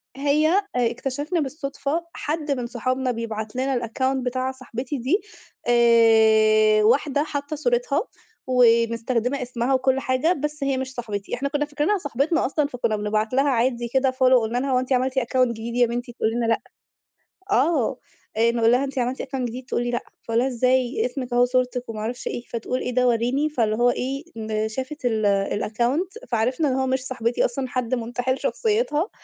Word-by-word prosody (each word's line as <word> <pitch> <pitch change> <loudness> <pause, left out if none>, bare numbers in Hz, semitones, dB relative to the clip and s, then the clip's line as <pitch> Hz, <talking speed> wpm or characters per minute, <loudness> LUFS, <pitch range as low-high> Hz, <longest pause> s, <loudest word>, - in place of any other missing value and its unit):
هي 290 +3 +2
آآ 395 +4 +3 0.3
اكتشفنا 285 +7 -3
بالصدفة، 285 +2 -3
حد 300 -1 -3
من 250 -3 -1
صحابنا 255 +2 -1
بيبعت 220 -1 -5
لنا 260 -1 0
الaccount 260 +3 0
بتاع 255 +1 -1
صاحبتي 260 +1 -5
دي 295 - +1 0.5
آآ، 220 -2 +5
واحدة 280 +5 +3
حاطة 285 0 -4
صورتها، 485 +10 +1 0.5
ومستخدمة 235 +1 +2
اسمها 245 +1 -1
وكل 260 0 +2
حاجة، 260 +7 +1
بس 300 -1 -4
هي 275 -1 0
مش 260 0 -4
صاحبتي. 210 -5 -4
إحنا 280 +3 -2
كنا 295 0 0
فاكرينها 300 +8 0
صاحبتنا 290 0 0
أصلًا 290 +2 0
فكنا 235 -5 -1
بنبعت 215 +2 -1
لها 275 +2 +3
عادي 240 -1 +1
كده 265 +2 +2
follow، 255 -1 +4
قلنا 225 +2 -2
لها: 270 +1 -1
"هو 250 - +3
أنتِ 255 +1 -1
عملتِ 260 +1 +1
account 255 +1 +2
جديد 235 0 -5
يا 245 0 +5
بنتي؟" 240 +1 -4
تقول 220 - 0
لنا: 235 0 -1
"لأ." 225 0 +1 0.9
آه، 270 - +2 0.4
آآ 230 +1 +4
نقول 230 -1 +3
لها: 250 +3 +3
"أنتِ 275 0 -5
عملتِ 250 +2 -1
account 270 -1 -4
جديد؟" 245 +2 -6
تقول 240 - -1
لي: 240 - -2
"لأ." 240 - 0 0.2
فأقول 230 0 0
لها: 255 - +2
"إزاي؟ 255 - +1
اسمك 260 - -4
أهو 245 0 +5
صورتك 250 -1 -1
وما 215 -1 -5
أعرفش 235 +3 -4
إيه." 240 - -4
فتقول: 240 +2 -3
"إيه - - -2
ده؟ 250 0 +3
وريني." 245 +6 +1
فاللي 225 -7 0
هو 245 0 +4
إيه 270 +4 -3 0.4
شافت 260 +4 -6
ال 220 -3 +1 0.4
الaccount 300 - -1
فعرفنا 250 +6 +1
إن 260 - 0
هو 265 0 0
مش 260 0 -1
صاحبتي 240 -2 0
أصلًا، 260 +2 -2
حد 250 0 -1
منتحل 245 +2 -2
شخصيتها. 425 -6 0
255 Hz, 180 wpm, -23 LUFS, 235-275 Hz, 0.9 s, آآ